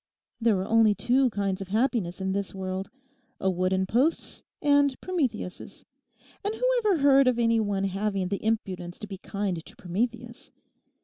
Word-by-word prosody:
There 225 -4 +2
are 190 - -3
only 225 -2 +4
two 255 +4 +2
kinds 200 -3 -2
of 195 - -5
happiness 215 -4 0
in 190 0 -1
this 200 0 -3
world—a 195 +4 -5
wooden 185 +1 +1
post's 255 - 0 0.2
and 285 -2 +3
Prometheus's. 265 - -3 0.6
And 415 +2 -2
who 470 - -8 0.2
ever 420 -6 +2
heard 275 -1 +6
of 250 -2 +3
any 230 -1 +3
one 205 -2 0
having 195 -1 -1
the 200 - -3
impudence 185 -5 -2
to - - -7
be 195 -2 -8
kind 195 -5 -3
to - - -16
Prometheus? 235 +6 -4
210 Hz, 160 wpm, -27 LUFS, 190-255 Hz, 0.6 s, heard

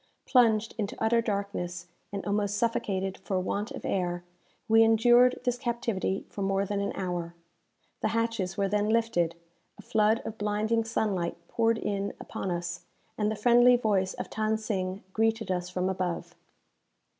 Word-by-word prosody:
Plunged 225 -3 +3
into 205 -1 -3
utter 230 +1 +3
darkness, 200 -5 -3 0.3
and 200 -1 -4
almost 205 0 0
suffocated 195 -4 -1
for 190 -2 -2
want 200 +3 -2
of - - -7
air, 175 -2 -1 0.4
we 225 0 +6
endured 240 +3 +5
this 245 0 0
captivity 235 -6 -2
for 200 - -7
more 195 0 +1
than 200 +1 -2
an 200 - -1
hour. 175 -2 -3 0.6
The - - 0
hatches 225 -4 -1
were 200 -1 +2
then 210 +1 +1
lifted, 220 -8 +1 0.4
a - - -12
flood 220 +1 +2
of 220 - -6
blinding 215 +2 0
sunlight 200 -6 -1
poured 230 -1 +2
in 200 -2 -2
upon 195 - -5
us, 175 0 -3 0.3
and 210 -1 0
the 220 - -1
friendly 240 +2 +6
voice 200 -5 +1
of - - -5
Than 220 0 0
Sing 195 -3 -3
greeted 225 -2 +1
us 180 -1 -2
from 180 0 -1
above. 185 -2 -2
210 Hz, 155 wpm, -28 LUFS, 190-225 Hz, 0.6 s, we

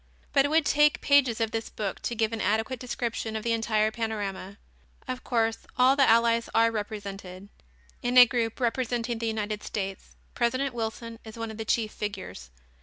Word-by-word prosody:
But 275 -1 +5
it - - +2
would 315 +1 +2
take 295 +1 +4
pages 270 -5 +3
of 225 -1 0
this 225 0 -3
book 205 -3 -4
to 240 - -3
give 220 0 0
an 225 - -3
adequate 220 +5 0
description 235 -2 -3
of 220 - -3
the 235 - 0
entire 220 -1 +1
panorama. 205 -3 -4 0.5
Of 255 0 -4
course, 225 -2 0
all 255 +2 +5
the 275 -1 +4
allies 230 0 +3
are 230 0 +5
represented. 200 -3 -6 0.5
In 245 +1 +1
a 250 - +12
group 230 -1 -2
representing 240 -1 -1
the 230 - -2
United 215 -1 -2
States, 195 -2 -5 0.2
President 255 +3 0
Wilson 230 0 -5
is 220 0 -10
one 225 -1 -4
of 220 - -9
the 220 - -3
chief 220 -1 0
figures. 90 - -6
225 Hz, 180 wpm, -27 LUFS, 215-240 Hz, 0.5 s, a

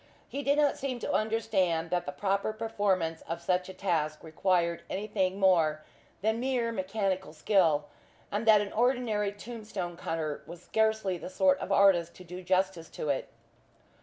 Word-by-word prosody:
He 280 - -4
did 285 +1 +2
not 295 -2 +3
seem 260 -2 -2
to - - -2
understand 190 -7 +1
that 175 -1 0
the - - -2
proper 195 +7 -1
performance 200 -7 -1
of 165 +1 -2
such 180 +2 0
a - - -7
task 155 -5 -1
required 170 +1 +1
anything 195 -1 -1
more 165 -5 +3 0.4
than 220 +1 +1
mere 245 -2 0
mechanical 190 -4 -2
skill, 160 -3 +2 0.5
and 210 +3 -2
that 215 -2 +7
an 205 - -5
ordinary 230 -4 +1
tomb 225 +2 -9
stone 180 -5 -4
cutter 160 -3 -3
was 170 +1 -10
scarcely 220 -4 +1
the - - -7
sort 280 +9 +3
of - - -5
artist 175 -4 +4
to 185 - -12
do 180 +1 -8
justice 185 -2 0
to 150 - -5
it. 140 - -1
190 Hz, 165 wpm, -30 LUFS, 170-220 Hz, 0.5 s, that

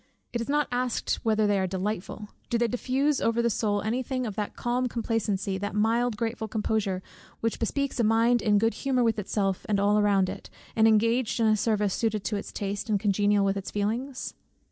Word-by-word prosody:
it 235 - -1
is 235 - -5
not 295 +1 +2
asked 245 -1 -1
whether 220 -1 +2
they 205 -1 +2
are 190 - 0
delightful. 205 +2 -4 0.2
Do 240 - +1
they 235 0 +2
diffuse 265 +4 0
over 230 +1 +1
the 235 0 +2
soul 205 -1 0
any 230 +4 0
thing 255 0 -2
of 215 - -3
that 205 +1 -4
calm 245 +1 0
complacency, 210 -5 -1
that 205 +1 -4
mild 230 +3 +2
and - - -11
grateful 225 -1 -2
composure, 210 -3 -1 0.4
which 230 0 -1
bespeaks 275 +3 -1
a - - +3
mind 230 +2 +3
in 210 -1 +3
good 225 +2 +2
humour 260 -3 0
with 225 -2 +1
itself 195 -1 -1
and 205 -2 +2
all 205 +1 +3
around 200 -2 +3
it, - - -7 0.3
and 220 0 +5
engaged 230 +2 +2
in 230 - +3
a 215 0 +4
service 210 -2 +1
suited 215 -3 -1
to 210 - -2
its 200 - -5
taste, 200 +2 -4
and 205 -2 +2
congenial 205 0 +2
with 195 0 +1
its 195 - -5
feelings? 235 +6 -3
220 Hz, 210 wpm, -27 LUFS, 205-235 Hz, 0.4 s, and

